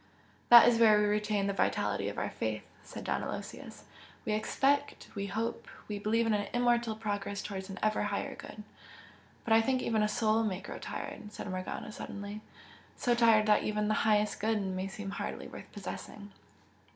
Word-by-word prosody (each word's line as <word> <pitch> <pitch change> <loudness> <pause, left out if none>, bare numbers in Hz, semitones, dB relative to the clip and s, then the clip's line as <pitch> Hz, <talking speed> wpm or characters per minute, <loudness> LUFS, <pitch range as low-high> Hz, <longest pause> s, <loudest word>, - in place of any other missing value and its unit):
"That 240 0 +10
is 235 -1 +4
where 220 -2 +7
we 210 - +3
retain 210 -1 +1
the 200 - 0
vitality - - 0
of - - -8
our - - -2
faith - - -3
" - - -26
said - - -8
Don - - -1
Aloysius - - -7 0.4
"We 215 - 0
expect 275 +6 0
we 200 -1 -3
hope! 220 +4 -3 0.2
We 210 -1 -4
believe 225 +3 +1
in 225 - +2
an 205 -1 0
immortal 240 -2 +2
progress 205 -2 -3
towards 190 -1 -5
an 190 - -7
ever 215 0 +2
Higher 205 -1 -2
Good." 210 - -10 0.8
"But 225 - +2
I 225 - +7
think 255 +2 0
even 220 -2 +1
a 210 - +3
soul 215 +1 +2
may 195 -4 -1
grow - - -8
tired!" 210 - -6
said - - -7
Morgana, 185 +3 -5
suddenly 205 0 -7 0.5
"so 245 - +1
tired 230 -3 +5
that 210 -1 +4
even 210 0 -1
the - - +3
Highest 210 -1 +2
Good 220 0 +1
may 190 -1 -2
seem 195 0 -6
hardly - - -5
worth - - -11
possessing!" 205 -1 -8
210 Hz, 190 wpm, -31 LUFS, 205-225 Hz, 0.8 s, That